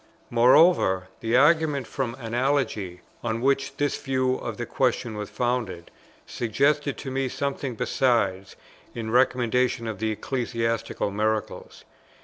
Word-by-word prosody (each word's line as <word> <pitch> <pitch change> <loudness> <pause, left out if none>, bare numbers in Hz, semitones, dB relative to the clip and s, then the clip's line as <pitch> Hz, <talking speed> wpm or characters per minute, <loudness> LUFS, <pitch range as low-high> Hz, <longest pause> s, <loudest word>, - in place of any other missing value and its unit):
Moreover, 120 - +4
the 115 +2 +1
argument 150 -2 +3
from 125 -2 -3
Analogy, 115 -7 -1 0.2
on 115 -1 -1
which 135 +2 0
this 145 -1 -1
view 130 -2 0
of - - -6
the - - -3
question 110 -2 -1
was 105 -1 -5
founded, 120 -9 -2 0.3
suggested 140 +5 0
to 135 - -6
me 135 0 -1
something 140 -2 -3
besides, 105 -7 0 0.4
in 110 -2 -4
recommendation 125 -1 +2
of 110 -4 -5
the 110 0 0
Ecclesiastical 115 -2 -2
Miracles. 110 +1 -3
120 Hz, 125 wpm, -25 LUFS, 110-135 Hz, 0.4 s, Moreover